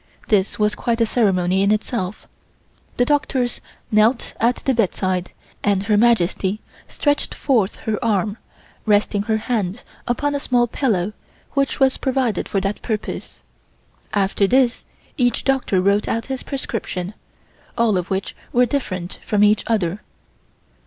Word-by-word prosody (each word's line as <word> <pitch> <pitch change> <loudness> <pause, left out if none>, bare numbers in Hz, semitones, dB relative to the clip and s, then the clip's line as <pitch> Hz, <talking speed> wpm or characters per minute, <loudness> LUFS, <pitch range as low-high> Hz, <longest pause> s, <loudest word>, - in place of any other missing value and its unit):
This 205 -2 +2
was 210 0 +2
quite 230 +2 -1
a 230 - +4
ceremony 190 -5 +2
in 200 +1 +3
itself. 215 -2 -2 0.7
The 245 - +3
doctors 265 -3 0 0.3
knelt 220 +3 +3
at 240 +2 +3
the 270 - 0
bedside, 185 -5 0 0.3
and 200 -2 +2
Her 210 +1 +2
Majesty 205 -3 +2 0.3
stretched 290 -1 0
forth 230 -8 +1
her 220 +2 -1
arm, 210 -1 +1 0.5
resting 205 -1 +3
her 220 +1 0
hand 215 -2 -2 0.2
upon 290 +4 0
a 285 - 0
small 245 -3 +2
pillow 215 -6 0 0.4
which 275 -1 0
was 265 -1 +3
provided 260 -6 0
for 195 - +1
that 195 +2 -2
purpose. 220 -2 -4 0.7
After 200 0 +2
this 250 +1 +2 0.3
each 245 -2 +1
doctor 265 -8 +1
wrote 200 +3 +2
out 230 - -1
his 260 - -4
prescription, 215 -8 -4 0.6
all 230 -3 +3
of 180 -1 -2
which 190 +1 -2 0.2
were 245 +1 +4
different 190 -10 -3
from 210 -1 +2
each 210 0 +4
other. 205 -3 0
215 Hz, 140 wpm, -21 LUFS, 195-245 Hz, 0.7 s, a